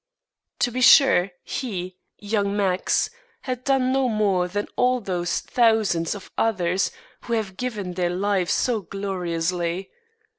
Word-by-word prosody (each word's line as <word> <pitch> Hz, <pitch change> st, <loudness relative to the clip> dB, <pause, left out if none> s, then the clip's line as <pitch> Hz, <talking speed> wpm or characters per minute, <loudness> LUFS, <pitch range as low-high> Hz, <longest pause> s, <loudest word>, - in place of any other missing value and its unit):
To 245 Hz, -, +2 dB
be 255 Hz, +2 st, -3 dB
sure 255 Hz, -8 st, +6 dB
he, 185 Hz, -7 st, -5 dB, 0.2 s
young 205 Hz, -1 st, -1 dB
Max, 190 Hz, -2 st, +1 dB, 0.3 s
had 255 Hz, -1 st, -4 dB
done 265 Hz, -2 st, +2 dB
no 265 Hz, -1 st, +2 dB
more 200 Hz, -5 st, +1 dB
than 205 Hz, +3 st, -3 dB
all 250 Hz, 0 st, +2 dB
those 180 Hz, -5 st, -2 dB
thousands 215 Hz, -8 st, +2 dB
of 200 Hz, -, -11 dB
others 185 Hz, -4 st, +1 dB, 0.4 s
who 235 Hz, -, -3 dB
have 215 Hz, -5 st, -2 dB
given 210 Hz, -6 st, -4 dB
their 175 Hz, -1 st, 0 dB
lives 190 Hz, 0 st, 0 dB
so 235 Hz, -4 st, +1 dB
gloriously. 180 Hz, -1 st, -3 dB
200 Hz, 135 wpm, -23 LUFS, 180-230 Hz, 0.4 s, sure